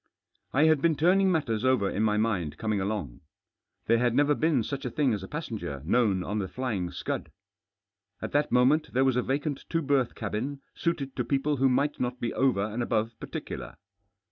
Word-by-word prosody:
I 140 Hz, -, +3 dB
had 155 Hz, -3 st, +4 dB
been 165 Hz, 0 st, +3 dB
turning 185 Hz, +5 st, +4 dB
matters 130 Hz, -10 st, 0 dB
oyer 130 Hz, -6 st, +3 dB
in 105 Hz, -, -1 dB
jny 105 Hz, -1 st, +2 dB
mind 95 Hz, -9 st, -1 dB
conning 110 Hz, -3 st, -1 dB
along. 95 Hz, -, -3 dB, 0.6 s
There 115 Hz, -, +3 dB
had 120 Hz, -1 st, +2 dB
never 145 Hz, +2 st, +4 dB
been 150 Hz, -5 st, +2 dB
such 140 Hz, +4 st, -4 dB
a 125 Hz, -, -2 dB
thing 135 Hz, -1 st, +1 dB
as 105 Hz, -, -2 dB
a 95 Hz, -, -7 dB
passenger 100 Hz, -, -5 dB
known 95 Hz, -1 st, +2 dB
on 105 Hz, +3 st, -2 dB
The 95 Hz, -, -2 dB
Flying 105 Hz, -7 st, -3 dB
Scud, -, -, -4 dB, 0.9 s
^t -, -, -3 dB
that 145 Hz, +1 st, +2 dB
IHQipent 130 Hz, +6 st, +3 dB
there 130 Hz, +2 st, +3 dB
was 130 Hz, -2 st, +2 dB
a 125 Hz, -, +2 dB
vacant 140 Hz, +2 st, -2 dB
two 165 Hz, -1 st, 0 dB
berth 135 Hz, -3 st, +1 dB
cabin 125 Hz, +6 st, -4 dB
suited 140 Hz, -6 st, -2 dB
to 125 Hz, -, +1 dB
people 140 Hz, +4 st, 0 dB
who 135 Hz, +1 st, +3 dB
might 140 Hz, +4 st, +1 dB
not 125 Hz, 0 st, -2 dB
be 115 Hz, -, -2 dB
over 125 Hz, -7 st, +2 dB
and 110 Hz, +3 st, -3 dB
above 115 Hz, -1 st, 0 dB
particular. -, -, -6 dB
125 Hz, 195 wpm, -28 LUFS, 110-145 Hz, 0.9 s, had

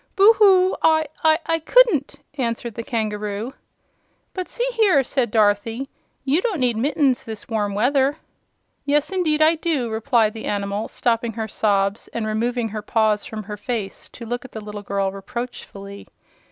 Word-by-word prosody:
"Boo 410 Hz, +3 st, +7 dB
hoo! 380 Hz, -3 st, +5 dB
I 315 Hz, -1 st, +4 dB, 0.2 s
I 325 Hz, +1 st, +2 dB
couldn't," 345 Hz, -, +3 dB, 0.2 s
answered 235 Hz, -3 st, -3 dB
the 230 Hz, -, -5 dB
kangaroo. 215 Hz, 0 st, -3 dB, 0.8 s
"But, 370 Hz, -1 st, -5 dB
see -, -, -2 dB
here," 410 Hz, -, +4 dB
said 260 Hz, -2 st, 0 dB
Dorothy, 220 Hz, +4 st, +1 dB, 0.4 s
"you 285 Hz, +6 st, +2 dB
don't 415 Hz, -8 st, -1 dB
need 245 Hz, -3 st, +2 dB
mittens 270 Hz, +1 st, +1 dB
in -, -, -9 dB
this 220 Hz, -, -7 dB
warm 210 Hz, -3 st, -1 dB
weather." 270 Hz, +6 st, +2 dB, 0.7 s
"Yes, 295 Hz, +4 st, +1 dB
indeed 315 Hz, -5 st, +2 dB
I 315 Hz, +1 st, +5 dB
do," 310 Hz, -8 st, -1 dB
replied 220 Hz, -1 st, +2 dB
the 225 Hz, -, -7 dB
animal, 200 Hz, +1 st, -2 dB
stopping 230 Hz, -1 st, -1 dB
her 220 Hz, 0 st, -4 dB
sobs 200 Hz, -1 st, 0 dB
and 230 Hz, -2 st, -2 dB
removing 230 Hz, +2 st, -1 dB
her 215 Hz, 0 st, -5 dB
paws 215 Hz, -1 st, +1 dB
from 215 Hz, -1 st, -6 dB
her 210 Hz, +1 st, -7 dB
face 210 Hz, -2 st, -5 dB
to 235 Hz, -, -10 dB
look 240 Hz, +2 st, -4 dB
at 260 Hz, -, -13 dB
the 220 Hz, -, -7 dB
little 210 Hz, -1 st, -6 dB
girl 195 Hz, -1 st, -1 dB
reproachfully. 200 Hz, -2 st, -8 dB
235 Hz, 165 wpm, -22 LUFS, 215-295 Hz, 0.8 s, Boo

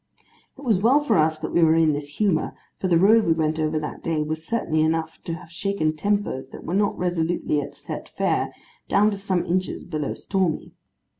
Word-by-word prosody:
It -, -, -12 dB
was 225 Hz, -9 st, +2 dB
well 245 Hz, +8 st, +5 dB
for 295 Hz, -, +1 dB
us, 155 Hz, 0 st, +3 dB
that 155 Hz, 0 st, -5 dB
we 170 Hz, -, +4 dB
were 160 Hz, -1 st, +5 dB
in 160 Hz, -2 st, +4 dB
this 145 Hz, 0 st, -5 dB
humour, 200 Hz, -7 st, +1 dB, 0.2 s
for 190 Hz, -, -1 dB
the 170 Hz, -2 st, +4 dB
road 215 Hz, +6 st, +6 dB
we 165 Hz, -, +3 dB
went 160 Hz, -1 st, 0 dB
over 155 Hz, 0 st, 0 dB
that 150 Hz, -1 st, -4 dB
day, 160 Hz, -2 st, 0 dB
was 155 Hz, +1 st, -4 dB
certainly 165 Hz, -6 st, 0 dB
enough 160 Hz, 0 st, -1 dB
to 165 Hz, -, -3 dB
have 165 Hz, 0 st, -12 dB
shaken 170 Hz, -3 st, -1 dB
tempers 200 Hz, -6 st, -1 dB
that -, -, -11 dB
were 170 Hz, -, -4 dB
not 205 Hz, +1 st, +1 dB
resolutely 175 Hz, -3 st, 0 dB
at 145 Hz, -, -8 dB
Set -, -, -7 dB
Fair, -, -, 0 dB, 0.4 s
down 210 Hz, +2 st, +4 dB
to 200 Hz, -, -3 dB
some 190 Hz, -3 st, 0 dB
inches 185 Hz, +1 st, -1 dB
below 150 Hz, -3 st, -3 dB
Stormy. 185 Hz, -5 st, -1 dB
165 Hz, 210 wpm, -24 LUFS, 155-195 Hz, 0.4 s, road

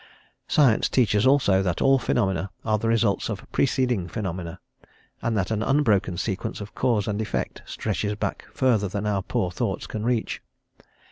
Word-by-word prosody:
Science 135 Hz, -7 st, +4 dB
teaches, 105 Hz, -2 st, +3 dB
also, 130 Hz, -9 st, +4 dB
that 90 Hz, -3 st, -1 dB
all 135 Hz, 0 st, +4 dB
phenomena 95 Hz, -6 st, 0 dB, 0.2 s
are 110 Hz, -1 st, +2 dB
the 115 Hz, -, -1 dB
results 115 Hz, -3 st, +1 dB
of 105 Hz, -2 st, -5 dB
preceding 125 Hz, -9 st, +1 dB
phenomena, 90 Hz, -5 st, -5 dB, 0.6 s
and 115 Hz, -1 st, 0 dB
that 95 Hz, +1 st, -1 dB
an 110 Hz, -1 st, 0 dB
unbroken 110 Hz, -9 st, +2 dB
sequence 95 Hz, +1 st, -3 dB
of 105 Hz, 0 st, -8 dB
cause 110 Hz, -5 st, +1 dB
and 105 Hz, 0 st, -1 dB
effect 110 Hz, -, -3 dB
stretches 105 Hz, -1 st, -2 dB
back -, -, -4 dB
further 115 Hz, -6 st, +2 dB
than 100 Hz, +2 st, -3 dB
our 100 Hz, -2 st, 0 dB
poor 90 Hz, -1 st, -1 dB
thoughts 95 Hz, +1 st, -2 dB
can 110 Hz, -, -5 dB
reach. 120 Hz, -1 st, -1 dB
105 Hz, 160 wpm, -25 LUFS, 95-115 Hz, 0.6 s, Science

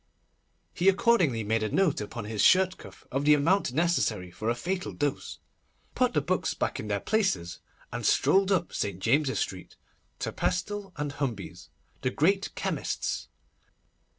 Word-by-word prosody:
He 180 Hz, +2 st, +4 dB
accordingly 185 Hz, -, +3 dB
made 110 Hz, +2 st, 0 dB
a 110 Hz, -, -1 dB
note, 185 Hz, -, +2 dB
upon 105 Hz, +1 st, -6 dB
his 105 Hz, -1 st, -2 dB
shirt 185 Hz, -, +4 dB
cuff, -, -, -13 dB
of 135 Hz, +2 st, -1 dB
the 150 Hz, 0 st, +6 dB
amount 165 Hz, +2 st, +2 dB
necessary 125 Hz, -, 0 dB
for 110 Hz, +5 st, -3 dB
a 120 Hz, -, +1 dB
fatal 180 Hz, +10 st, -3 dB
dose, 145 Hz, -2 st, -2 dB, 0.6 s
put -, -, +1 dB
the -, -, +3 dB
books -, -, -1 dB
back -, -, -2 dB
in 105 Hz, -, -5 dB
their 100 Hz, -1 st, 0 dB
places, 100 Hz, -, 0 dB, 0.3 s
and -, -, -4 dB
strolled 195 Hz, 0 st, +3 dB
up 180 Hz, -3 st, +1 dB
St. 100 Hz, -3 st, -2 dB
James's 135 Hz, +7 st, +2 dB
Street, 95 Hz, -1 st, -4 dB, 0.4 s
to -, -, -3 dB
Pestle 200 Hz, +2 st, -2 dB
and 145 Hz, -1 st, -2 dB
Humbey's, 125 Hz, -9 st, -5 dB, 0.3 s
the 130 Hz, -, +1 dB
great 190 Hz, +9 st, +1 dB
chemists. -, -, -2 dB
145 Hz, 155 wpm, -28 LUFS, -, 0.6 s, the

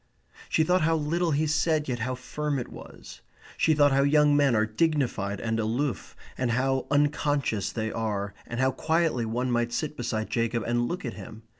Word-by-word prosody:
She 160 Hz, -, +3 dB
thought 180 Hz, +3 st, +2 dB
how 165 Hz, +1 st, +2 dB
little 165 Hz, +3 st, 0 dB
he 155 Hz, +1 st, +1 dB
said 155 Hz, 0 st, +1 dB
yet 125 Hz, -2 st, -2 dB
how 130 Hz, +3 st, -2 dB
firm 145 Hz, +3 st, -3 dB
it 125 Hz, -, -4 dB
was. -, -, -12 dB, 0.3 s
She 160 Hz, -, +3 dB
thought 145 Hz, -1 st, +5 dB
how 135 Hz, +1 st, +3 dB
young 145 Hz, +1 st, +4 dB
men 140 Hz, -4 st, +3 dB
are 110 Hz, 0 st, +3 dB
dignified 110 Hz, -6 st, 0 dB
and 115 Hz, 0 st, -1 dB
aloof, 115 Hz, +2 st, -2 dB, 0.2 s
and 130 Hz, -2 st, 0 dB
how 130 Hz, +2 st, 0 dB
unconscious 145 Hz, -6 st, +1 dB
they 110 Hz, -1 st, -3 dB
are, 105 Hz, -3 st, -2 dB
and 120 Hz, -, -5 dB
how 130 Hz, 0 st, +3 dB
quietly 160 Hz, -6 st, 0 dB
one 125 Hz, +3 st, -1 dB
might 120 Hz, 0 st, 0 dB
sit 150 Hz, +4 st, -3 dB
beside 110 Hz, -4 st, -3 dB
Jacob 115 Hz, -1 st, 0 dB
and 120 Hz, 0 st, 0 dB
look 175 Hz, 0 st, -4 dB
at 120 Hz, -, -4 dB
him. 110 Hz, 0 st, -10 dB
130 Hz, 190 wpm, -27 LUFS, 115-150 Hz, 0.3 s, thought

